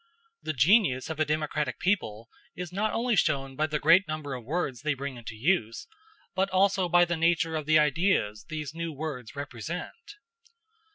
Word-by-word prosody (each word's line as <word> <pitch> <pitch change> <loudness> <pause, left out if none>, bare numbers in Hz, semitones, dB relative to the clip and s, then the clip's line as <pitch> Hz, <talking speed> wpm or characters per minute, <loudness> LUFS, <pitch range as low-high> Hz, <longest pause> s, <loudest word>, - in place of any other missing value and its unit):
The 155 - -3
genius 155 - +3
of 160 - -6
a 155 - +3
democratic 150 0 -1
people 115 - -1 0.3
is 180 -1 -6
not 215 +3 0
only 235 0 0
shown 135 -6 0
by 155 +2 0
the 155 -1 -1
great 165 +6 +5
number 155 -3 -4
of 125 -2 -6
words 140 -2 -2
they 150 -1 0
bring 140 0 -5
into 115 -2 -8
use, 115 - 0 0.5
but 190 +1 0
also 190 -1 +2
by 175 +1 +5
the 175 0 -1
nature 165 0 +1
of 155 -2 -3
the 155 0 +5
ideas 150 - +1
these 150 -2 -5
new 165 0 -4
words 145 -5 -6
represent. 165 - -7
155 Hz, 175 wpm, -28 LUFS, 135-180 Hz, 0.5 s, great